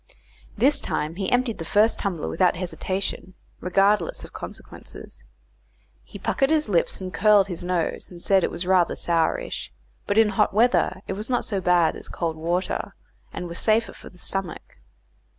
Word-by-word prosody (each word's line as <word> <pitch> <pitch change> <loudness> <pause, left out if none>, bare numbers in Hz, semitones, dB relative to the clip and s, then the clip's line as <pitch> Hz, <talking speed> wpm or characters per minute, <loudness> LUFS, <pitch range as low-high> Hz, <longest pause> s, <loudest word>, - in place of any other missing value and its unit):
This 270 +7 +3
time 155 +3 -2
he 195 -1 -2
emptied 245 -4 +1
the - - -3
first 210 +7 +3
tumbler 185 -6 -2
without 180 +1 +2
hesitation, 185 +1 -4 0.2
regardless 195 -1 +2
of - - -11
consequences. - - -9 0.8
He - - -11
puckered 270 - 0
his 310 -3 +2
lips 180 -5 +1
and 185 -2 -6
curled 200 +2 +4
his 175 -1 -5
nose, 175 -2 -2
and 175 - -11
said 190 +1 +3
it - - +1
was 180 - -4
rather 185 -2 +3
sourish; 165 -2 -1 0.4
but 205 - 0
in 220 -1 +6
hot 200 0 +1
weather 215 -4 +2
it - - -2
was 210 +5 -6
not 245 - +1
so 200 -3 -2
bad 175 -2 +3
as - - -9
cold 165 -2 -2
water, 175 +3 -2 0.4
and 180 - -5
was 170 0 -4
safer 225 +1 +2
for - - -12
the 180 - -19
stomach. 195 0 -5
185 Hz, 170 wpm, -24 LUFS, 175-210 Hz, 0.8 s, in